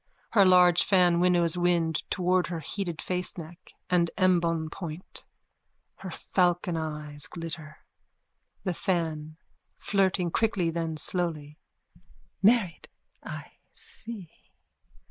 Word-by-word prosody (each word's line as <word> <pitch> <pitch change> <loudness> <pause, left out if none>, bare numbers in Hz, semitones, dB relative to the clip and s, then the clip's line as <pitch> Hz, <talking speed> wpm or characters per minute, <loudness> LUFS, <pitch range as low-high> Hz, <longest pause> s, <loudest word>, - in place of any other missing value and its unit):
Her 205 - +6
large 180 -1 +6
fan 180 -3 +4
winnows 175 -2 +4
wind 170 -3 +1
towards 180 -1 +1
her 170 -2 -3
heated 170 +1 -4
faceneck 180 -1 -5
and 175 -2 +2
embonpoint. 170 -2 0 0.7
Her 190 - -7
falcon 175 0 0
eyes 150 -1 -4
glitter.)_ 160 -2 -7 0.9
THE 185 - -1
FAN: 160 -4 -2 0.4
(Flirting 190 -3 +1
quickly, 195 -6 +1
then 165 -1 -3
slowly.) 155 -4 -2 0.8
Married, 200 -4 +3 0.3
I - - -8 0.2
see. 215 -7 -9
175 Hz, 95 wpm, -28 LUFS, 160-185 Hz, 0.9 s, Her